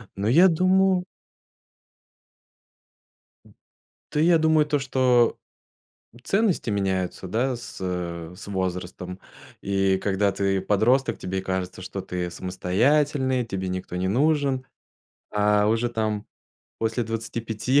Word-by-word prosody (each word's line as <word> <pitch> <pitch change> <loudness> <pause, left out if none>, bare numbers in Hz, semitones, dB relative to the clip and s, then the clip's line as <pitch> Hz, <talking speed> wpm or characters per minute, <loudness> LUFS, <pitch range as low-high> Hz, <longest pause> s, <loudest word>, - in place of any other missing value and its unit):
Но 100 +2 -2
я 170 +10 +7
думаю 185 +1 +3 2.4
Д - - -20 0.6
Та 150 - -2
я 165 +2 +5
думаю 160 -1 +3
то, 150 -1 0
что 125 -3 +2 0.9
ценности 200 - +1
меняются, 95 -2 -1
да, 120 +6 0
с, 120 0 -9
э, 85 -2 -4
с, 105 - -10
возрастом. 90 -1 -4 0.4
И 95 -1 +2
когда 100 +1 +1
ты 95 0 0
подросток, 120 +8 +2
тебе 95 +1 -3
кажется, 95 -1 -3
что 95 +1 -5
ты 90 -1 -4
самостоятельный, 130 - +1
тебе 95 -3 -3
никто 90 -1 -4
не 95 +1 -1
нужен, 135 +2 +1 0.6
а 105 0 +3
уже 115 +2 +1
там 110 -2 -2 0.5
после 115 +2 -1
25 115 +3 -1
110 Hz, 115 wpm, -25 LUFS, 95-135 Hz, 2.4 s, я